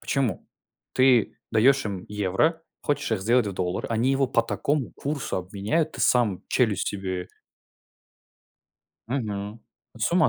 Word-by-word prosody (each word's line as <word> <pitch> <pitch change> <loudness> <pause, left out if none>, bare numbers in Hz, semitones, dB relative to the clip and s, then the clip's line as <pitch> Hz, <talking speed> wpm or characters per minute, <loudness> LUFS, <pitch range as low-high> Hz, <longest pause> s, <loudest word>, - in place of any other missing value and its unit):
Почему? 130 - -1 0.5
Ты 130 -3 +4 0.2
даешь 130 +5 +4
им 95 -3 -4
евро, 105 - +1 0.2
хочешь 145 -2 -1
их 105 - 0
сделать 120 +2 +3
в 100 - -2
доллар, 90 -1 -2
они 115 +3 +1
его 135 0 +2
по 120 -2 +2
такому 140 +3 -1
курсу 145 -1 -3
обменяют, 105 - -1
ты - - -7
сам 115 -7 +3
челюсть 110 -6 +1
себе 95 -2 -4 1.8
Мгм. 105 -4 -3 0.3
Ну - - -13
с 110 - 0
ума 170 -3 +5
115 Hz, 140 wpm, -25 LUFS, 100-135 Hz, 1.8 s, ума